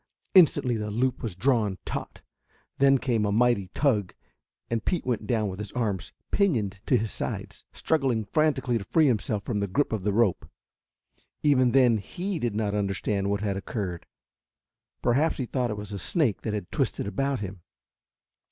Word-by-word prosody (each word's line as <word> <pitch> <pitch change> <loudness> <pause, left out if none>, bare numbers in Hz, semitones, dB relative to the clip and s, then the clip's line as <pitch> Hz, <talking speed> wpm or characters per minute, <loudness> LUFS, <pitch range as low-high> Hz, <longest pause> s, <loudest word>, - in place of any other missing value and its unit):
Instantly 135 -9 +5
the 105 0 -3
loop 125 +4 0
was 110 -7 -4
drawn 105 -2 +1
taut; - - -5 0.6
then 135 0 +6
came 120 -4 0
a 105 - +1
mighty 115 -3 +2
tug 110 -10 +1 0.5
and 115 -2 -2
Pete 180 - -1
went 115 -4 -2
down 110 -2 +1
with 95 0 -6
his 105 -2 -5
arms 105 -7 -2 0.2
pinioned 110 - +1
to - - +4
his 110 0 -2
sides, - - -5
struggling 130 -8 0
frantically 130 -1 +1
to - - -6
free 160 +10 +3
himself 105 -5 0
from 105 -1 -2
the 100 - -1
grip 140 +7 0
of 110 - -1
the 105 +2 0
rope. 105 -3 +1 0.9
Even 130 -4 +4
then 125 -4 +4
he 180 - -4
did 120 -6 -1
not 105 -2 -1
understand 100 0 -1
what 100 0 0
had 100 -2 -1
occurred. 95 -4 -4 1.0
Perhaps 140 +7 +2
he 130 - -2
thought 125 0 -1
it 105 - -3
was 105 0 -7
a 100 - -4
snake 130 - +1
that 110 -2 -2
had 100 -4 -5
twisted - - -1
about 135 +4 -1
him. 95 -2 -6
110 Hz, 175 wpm, -27 LUFS, 100-130 Hz, 1.0 s, then